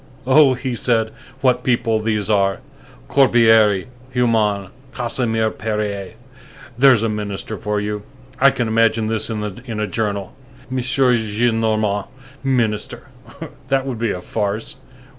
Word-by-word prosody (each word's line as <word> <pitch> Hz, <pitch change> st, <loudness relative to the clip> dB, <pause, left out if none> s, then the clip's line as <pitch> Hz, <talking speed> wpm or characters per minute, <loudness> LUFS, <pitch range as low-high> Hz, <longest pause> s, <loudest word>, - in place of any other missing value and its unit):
"Oh!" 135 Hz, 0 st, +5 dB
he 130 Hz, 0 st, -4 dB
said, 115 Hz, -2 st, +1 dB, 0.3 s
"what 130 Hz, -2 st, +2 dB
people 115 Hz, -3 st, +1 dB
these 105 Hz, -2 st, -1 dB
are! 100 Hz, -2 st, +2 dB, 0.5 s
Corbière! 110 Hz, -, +4 dB, 0.3 s
Humann! 110 Hz, -6 st, +1 dB, 0.3 s
Casimir 115 Hz, -3 st, 0 dB
Périer! 105 Hz, -3 st, -3 dB, 0.6 s
There's 125 Hz, -2 st, +5 dB
a -, -, +2 dB
minister 105 Hz, 0 st, -4 dB
for 105 Hz, +2 st, -2 dB
you! 105 Hz, 0 st, -3 dB, 0.4 s
I 140 Hz, -, +7 dB
can 120 Hz, -3 st, -2 dB
imagine 115 Hz, 0 st, +2 dB
this 110 Hz, 0 st, -1 dB
in 110 Hz, -2 st, -3 dB
a 105 Hz, +1 st, -4 dB
journal: 100 Hz, -1 st, -3 dB, 0.4 s
'M. 130 Hz, -, -2 dB
Gillenorman, 110 Hz, -4 st, +1 dB, 0.4 s
minister!' 115 Hz, -6 st, -1 dB, 0.6 s
that 135 Hz, 0 st, +1 dB
would 130 Hz, -4 st, -4 dB
be 115 Hz, -1 st, 0 dB
a 90 Hz, -, -3 dB
farce. 105 Hz, +2 st, -3 dB
110 Hz, 125 wpm, -19 LUFS, 105-120 Hz, 0.6 s, I